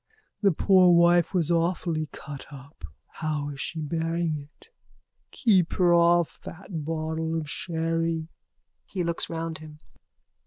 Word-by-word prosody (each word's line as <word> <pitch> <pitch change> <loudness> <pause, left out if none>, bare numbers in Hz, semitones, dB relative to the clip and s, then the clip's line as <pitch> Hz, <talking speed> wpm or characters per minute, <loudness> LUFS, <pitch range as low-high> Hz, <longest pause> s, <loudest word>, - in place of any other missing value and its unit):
The 200 -2 +4
poor 185 +2 +5
wife 175 0 +5
was 175 -3 0
awfully 165 -2 0
cut 145 -2 -9
up. 140 +2 -11 0.2
How 150 -2 -3
is 140 -1 -6
she 160 - -3
bearing 165 +2 -1
it? 145 - -12 0.6
Keep 190 -8 +2
her 175 -2 +3
off 170 0 +3
that 170 -2 -7
bottle 160 +1 -2
of 155 - -6
sherry. 165 0 -2 0.6
_(He 185 -3 -2
looks 170 0 -1
round 165 -1 -4
him.) 155 -1 -11
165 Hz, 130 wpm, -26 LUFS, 155-175 Hz, 0.6 s, poor